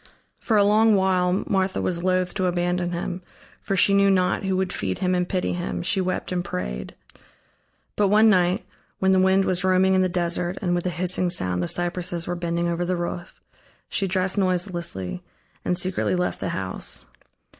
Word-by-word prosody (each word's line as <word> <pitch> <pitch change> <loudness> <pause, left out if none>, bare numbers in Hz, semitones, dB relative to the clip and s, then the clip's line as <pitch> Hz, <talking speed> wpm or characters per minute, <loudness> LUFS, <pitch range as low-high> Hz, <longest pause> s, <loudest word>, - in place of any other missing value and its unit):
For 220 - +1
a 205 - +5
long 215 +1 +4
while 185 -1 +1
Martha 190 -1 0
was 170 -1 -2
loath 185 -1 +1
to 185 -2 0
abandon 175 0 -1
him, 175 +1 -4 0.4
for 195 - -2
she 200 +1 +3
knew 200 0 +4
not 185 -2 +2
who 190 -1 0
would 190 -1 -1
feed 95 -2 -2
him 185 0 0
and 180 0 0
pity 185 -1 -1
him, 175 0 -4
she 190 +2 +1
wept 185 0 -3
and 180 -1 -1
prayed. 60 - -5 1.0
But 205 - +2
one 215 +3 +5
night, 180 -3 +2 0.3
when 190 0 +2
the 190 - +4
wind 190 +1 +3
was 185 -1 0
roaming 185 0 +3
in 190 - +3
the 185 - +1
desert 175 0 -2
and 175 -2 -1
with 175 +1 -1
a - - +1
hissing 180 +1 -1
sound 90 - -1
the 90 - -1
cypresses 175 - -1
were 175 - -3
bending 170 0 -2
over 170 +1 -1
the 180 +1 -1
roof, 175 0 -5 0.5
she 195 - 0
dressed 185 +2 +1
noiselessly 175 - -1 0.4
and 180 - 0
secretly 185 0 0
left 180 0 -1
the - - -3
house. 95 -9 0
180 Hz, 190 wpm, -24 LUFS, 175-190 Hz, 1.0 s, a